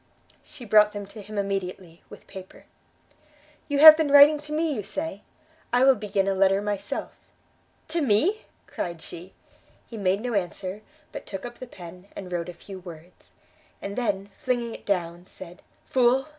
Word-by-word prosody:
She 250 - -12
brought 210 -1 +5
them 205 -1 -6
to 210 +2 -11
him 210 +1 -9
immediately, 190 -3 -4
with - - -13
paper. 190 -1 -12 1.0
"You 285 - -1
have 310 +1 +11
been 310 -2 0
writing 285 +1 +8
to 300 +1 -10
me, 315 0 0
you 220 - -3
say? 210 +3 -5 0.5
I 245 +1 +3
will 270 0 +7
begin 205 -3 -2
a 195 - +2
letter 195 0 +3
myself." 205 -1 -4 0.8
"To 335 +1 0
me?" 295 - +1 0.2
cried 170 -2 -6
she. 180 +3 -11 0.5
He 230 - -10
made 195 0 0
no 245 0 -3
answer, 190 +1 -3 0.3
but - - -9
took 195 +2 -6
up 240 0 -9
the 255 - -8
pen, 180 -2 -12
and 185 -2 -8
wrote 175 0 -3
a - - -7
few 190 +2 -10
words, 175 -1 -13 0.5
and 200 0 -6
then, 205 -4 -2
flinging 240 -2 -2
it - - -12
down, 175 -2 -2
said, 180 -1 -12 0.2
"Fool! 260 +2 +2
205 Hz, 170 wpm, -25 LUFS, 185-250 Hz, 1.0 s, have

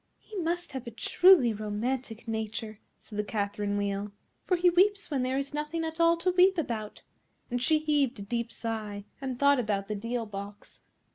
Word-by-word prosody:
"He 435 - -14
must 345 -1 -2
have 265 -3 -6
a - - -2
truly 265 +2 +5
romantic 225 +3 -3
nature," 220 -1 -4 0.2
said 210 - -8
the - - +2
Catherine 205 -1 -2
Wheel, 200 0 -2 0.4
"for 365 - +3
he 355 0 +4
weeps 395 +2 +3
when 275 -3 +1
there 255 +1 0
is 275 +1 -3
nothing 300 +2 -2
at 320 +1 -5
all 335 0 +5
to 355 +2 +1
weep 370 +1 +5
about;" 225 -9 -3 0.5
and 245 0 -1
she 310 +5 +4
heaved 295 -5 +1
a 200 - -6
deep 235 +2 -3
sigh 215 -3 -4 0.2
and 260 -2 -3
thought 280 0 +4
about 205 -4 -1
the 210 - -2
deal 230 +3 -3
box. 200 0 -9
245 Hz, 190 wpm, -29 LUFS, 210-315 Hz, 0.5 s, truly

